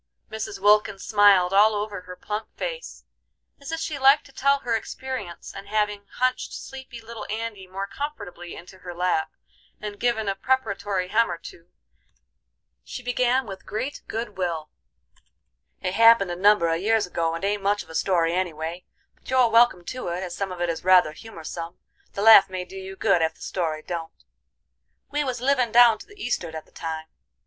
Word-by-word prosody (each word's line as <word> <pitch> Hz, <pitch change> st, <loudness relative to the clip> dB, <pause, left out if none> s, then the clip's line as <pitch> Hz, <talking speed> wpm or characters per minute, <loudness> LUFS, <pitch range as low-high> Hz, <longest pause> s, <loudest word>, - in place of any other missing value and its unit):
Mrs. 220 Hz, -2 st, -5 dB
Wilkins 205 Hz, -1 st, +3 dB
smiled 200 Hz, -4 st, +5 dB
all 210 Hz, +2 st, +5 dB
over 205 Hz, -2 st, -3 dB
her 180 Hz, 0 st, -10 dB
plump 210 Hz, +3 st, -5 dB
face, -, -, -6 dB, 0.5 s
as 280 Hz, +3 st, -8 dB
if 325 Hz, -, -2 dB
she 305 Hz, -3 st, -3 dB
liked 275 Hz, +2 st, +5 dB
to 275 Hz, -, -16 dB
tell 280 Hz, +1 st, +2 dB
her 235 Hz, -1 st, 0 dB
experience, 225 Hz, -6 st, -6 dB
and 195 Hz, 0 st, -9 dB
having 210 Hz, -1 st, -1 dB
hunched 255 Hz, 0 st, 0 dB
sleepy 265 Hz, -3 st, -9 dB
little 225 Hz, -1 st, -9 dB
Andy 215 Hz, -3 st, -4 dB
more 195 Hz, +2 st, -4 dB
comfortably 200 Hz, -, -7 dB
into 185 Hz, +2 st, -12 dB
her 180 Hz, -1 st, -8 dB
lap, 175 Hz, -3 st, 0 dB, 0.5 s
and 210 Hz, -1 st, -7 dB
given 235 Hz, -3 st, 0 dB
a 195 Hz, -, +1 dB
preparatory 200 Hz, -5 st, -1 dB
hem 230 Hz, +3 st, +3 dB
or -, -, -3 dB
two, 165 Hz, 0 st, -12 dB, 1.2 s
she 250 Hz, -, -8 dB
began 250 Hz, +1 st, +1 dB
with 195 Hz, -2 st, -8 dB
great 260 Hz, +7 st, -4 dB
good 220 Hz, -3 st, -5 dB
will. 165 Hz, -4 st, -2 dB, 1.1 s
"It 185 Hz, -, -1 dB
happened 230 Hz, -4 st, +6 dB
a -, -, -2 dB
number 200 Hz, -1 st, +4 dB
a 165 Hz, 0 st, +1 dB
years 215 Hz, +4 st, +2 dB
ago 165 Hz, -2 st, -1 dB
and 165 Hz, -, -4 dB
ain't 205 Hz, 0 st, 0 dB
much 205 Hz, +1 st, +1 dB
of -, -, -22 dB
a -, -, -9 dB
story 170 Hz, -1 st, +1 dB
any 180 Hz, -2 st, -1 dB
way. 165 Hz, +3 st, -6 dB, 0.3 s
But -, -, -17 dB
you're 255 Hz, -3 st, +4 dB
welcome 230 Hz, -6 st, +4 dB
to 255 Hz, +1 st, -5 dB
it, 175 Hz, +2 st, -3 dB
as 175 Hz, -2 st, -5 dB
some 195 Hz, -1 st, -3 dB
of 180 Hz, -, -7 dB
it 175 Hz, 0 st, 0 dB
is 165 Hz, -, -6 dB
rather 180 Hz, -4 st, +5 dB
humorsome, 170 Hz, -2 st, -8 dB, 0.4 s
the 200 Hz, -, -3 dB
laugh 215 Hz, -3 st, +9 dB
may 185 Hz, -1 st, -4 dB
do 190 Hz, -, -13 dB
you 190 Hz, 0 st, -7 dB
good 195 Hz, -3 st, +2 dB
ef 160 Hz, 0 st, 0 dB
the -, -, -23 dB
story 160 Hz, -4 st, -3 dB
don't. 165 Hz, -2 st, -6 dB, 0.9 s
We 295 Hz, 0 st, 0 dB
was 255 Hz, -3 st, -3 dB
livin' 255 Hz, -3 st, +2 dB
down 235 Hz, -1 st, +7 dB
to -, -, -12 dB
the 410 Hz, -1 st, -17 dB
east'ard 175 Hz, -, -2 dB
at 160 Hz, -, -7 dB
the -, -, -26 dB
time. 160 Hz, -1 st, -5 dB
200 Hz, 190 wpm, -25 LUFS, 180-230 Hz, 1.2 s, laugh